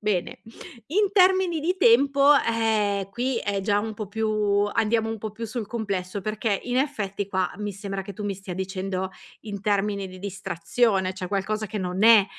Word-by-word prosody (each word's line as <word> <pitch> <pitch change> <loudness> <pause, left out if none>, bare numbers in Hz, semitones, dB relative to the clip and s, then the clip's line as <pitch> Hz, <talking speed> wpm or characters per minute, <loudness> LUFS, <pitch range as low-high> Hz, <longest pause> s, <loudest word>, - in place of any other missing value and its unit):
bene, 205 -4 -1 0.5
in 405 +7 +2
termini 375 -3 +4
di 355 +5 0
tempo, 280 -1 +5
eh, 220 -5 +1
qui 245 +4 -1
è 200 -2 -1
già 205 +1 +1
un 220 +1 -4
po' 210 0 -5
più 210 -1 +1
andiamo 220 0 +1
un 225 0 -4
po' 215 +1 -5
più 225 +2 -6
sul 225 0 -4
complesso, 200 -3 -3
perché 215 0 -1
in 245 0 -1
effetti 210 -8 -1
qua 190 -2 0
mi 210 0 -4
sembra 195 0 -5
che 200 +1 -8
tu 210 - -8
mi 200 -1 -1
stia 190 -1 -7
dicendo, 190 0 -3 0.3
in 205 -2 -6
termini 200 -1 0
di 185 0 -11
distrazione, 190 +1 0
cioè 185 -1 -5
qualcosa 210 +3 -2
che 210 +1 -4
non 185 +2 -1
è 225 -3 +8
210 Hz, 185 wpm, -25 LUFS, 195-225 Hz, 0.5 s, è